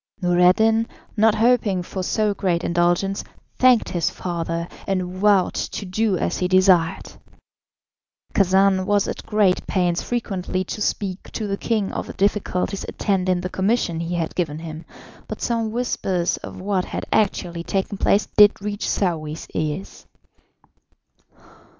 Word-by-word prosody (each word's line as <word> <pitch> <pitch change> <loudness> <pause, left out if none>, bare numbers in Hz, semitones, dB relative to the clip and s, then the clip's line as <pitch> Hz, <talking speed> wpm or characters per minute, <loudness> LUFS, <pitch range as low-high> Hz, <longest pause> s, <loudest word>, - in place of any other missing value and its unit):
Noureddin, 190 +5 +3 0.3
not 220 0 +4
hoping 220 -5 +2
for 190 +2 -5
so 210 +2 0
great 180 -3 -1
indulgence, 175 +3 +1 0.4
thanked 255 -3 +5
his 175 -2 0
father, 170 -1 -3 0.2
and 190 -1 0
vowed 200 -1 +3
to 205 - -4
do 195 +1 0
as - - -1
he 180 - +1
desired. 185 -3 +3 1.2
Khacan 190 0 +3
was 205 -1 +2
at - - -5
great 210 -4 +2
pains 175 -2 +1
frequently 190 -6 -2
to 210 - -6
speak 195 -2 -2
to 220 - -3
the 200 -1 -1
king 210 -1 -1
of - - -4
the - - -7
difficulties 195 -1 -1
attending 185 -3 0
the 180 - -4
commission 190 -3 0
he 170 +1 -3
had 165 -2 -2
given 155 -4 -2
him, 160 0 -8 0.4
but - - -6
some 230 -2 -1
whispers 195 -7 -1
of - - -9
what 190 -1 -1
had - - -5
actually 175 -5 0
taken 195 +3 -2
place 205 - +3
did 210 -1 +5
reach 205 +1 -3
Saouy's 160 -5 -2
ears. 150 -11 -4
190 Hz, 140 wpm, -22 LUFS, 175-210 Hz, 1.2 s, thanked